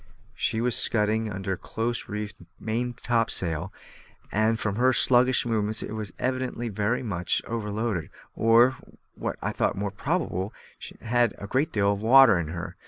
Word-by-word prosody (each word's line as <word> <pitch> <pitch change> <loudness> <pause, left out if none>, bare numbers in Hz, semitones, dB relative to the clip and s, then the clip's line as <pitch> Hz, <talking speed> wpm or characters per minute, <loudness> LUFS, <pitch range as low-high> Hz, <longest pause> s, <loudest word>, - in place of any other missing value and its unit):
She 110 - -1
was 125 -1 +1
scudding 110 0 +1
under 95 0 -3
close 115 +6 -4
reefed 105 0 -5 0.2
maintopsail, 115 -7 -1 0.6
and, 110 +2 +1
from 105 -2 -2
her 130 +2 +4
sluggish 125 +1 +4
movements, 110 -2 +1
was 110 -3 -5
evidently 130 -2 -2
very 105 +5 -1
much 90 -6 -1
overloaded, 105 -5 -3 0.3
or, 120 +3 +4 0.4
what - - -4
I - - -1
thought - - 0
more 100 0 -2
probable, 105 - -2 0.5
had 120 +1 +1
a - - -7
great 135 +9 0
deal 100 -1 +2
of 100 - -6
water 125 -3 +7
in 80 - -3
her. 85 +2 -6
110 Hz, 145 wpm, -26 LUFS, 100-120 Hz, 0.6 s, water